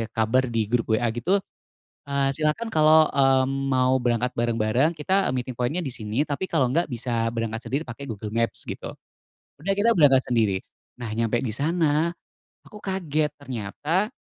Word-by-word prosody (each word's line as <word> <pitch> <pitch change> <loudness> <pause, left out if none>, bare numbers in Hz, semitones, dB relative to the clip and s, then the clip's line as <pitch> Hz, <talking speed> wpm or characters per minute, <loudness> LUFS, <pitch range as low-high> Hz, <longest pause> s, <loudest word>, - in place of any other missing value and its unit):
kabar 115 +4 +2
di 115 -2 0
grup 120 -1 +1
WA 120 +2 0
gitu, 175 - +1 0.7
eee, 140 -1 +1
silakan 155 +9 0
kalau, 155 0 +6
eee, 135 -1 +4 0.3
mau 130 0 +3
berangkat 120 +1 0
bareng-bareng 120 +5 +1
kita 190 +6 +1
meeting 125 0 -3
point-nya 125 +9 -1
disini 120 +1 -2
tapi 150 +6 -3
kalau 150 -6 +2
enggak 165 +3 +1
bisa 115 -2 -1
berangkat 115 -1 -3
sendiri 140 +4 -1
pakai 120 +4 -8
Google 105 -1 -5
Maps 115 0 -1
gitu. - - -6 0.7
Udah 195 +5 0
kita 215 +3 +3
berangkat 140 -5 +5
sendiri. 110 -6 +2 0.4
Nah, 120 -3 -6
nyampe 115 +1 0
di 110 - -2
sana 155 +3 +1 0.5
aku 210 - -13
kaget 155 -6 -1
ternyata 145 - -2
130 Hz, 155 wpm, -24 LUFS, 115-155 Hz, 0.7 s, kalau